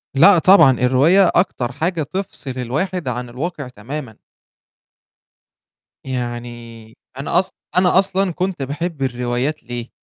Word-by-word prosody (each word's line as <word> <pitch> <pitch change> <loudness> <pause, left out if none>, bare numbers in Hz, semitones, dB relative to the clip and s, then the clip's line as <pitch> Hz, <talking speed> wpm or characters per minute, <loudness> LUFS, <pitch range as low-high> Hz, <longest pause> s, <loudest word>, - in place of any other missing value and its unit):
لأ 180 +6 +7
طبعًا، 165 -5 +7
الرواية 145 +10 +4
أكتر 130 -9 0
حاجة 160 +4 -2
تفصِل 185 -4 -5
الواحد 155 +7 -3
عن 125 0 -3
الواقع 140 +3 -5
تمامًا. 125 +1 -8 1.9
يعني 120 -3 -6 0.2
أنا 140 +5 +1
أص 185 - -1 0.3
أنا 180 0 +4
أصلًا 195 -1 0
كنت 185 -4 -3
باحب 145 +3 -4
الروايات 125 +3 -2
ليه؟ 120 0 -6
140 Hz, 115 wpm, -19 LUFS, 125-180 Hz, 1.9 s, لأ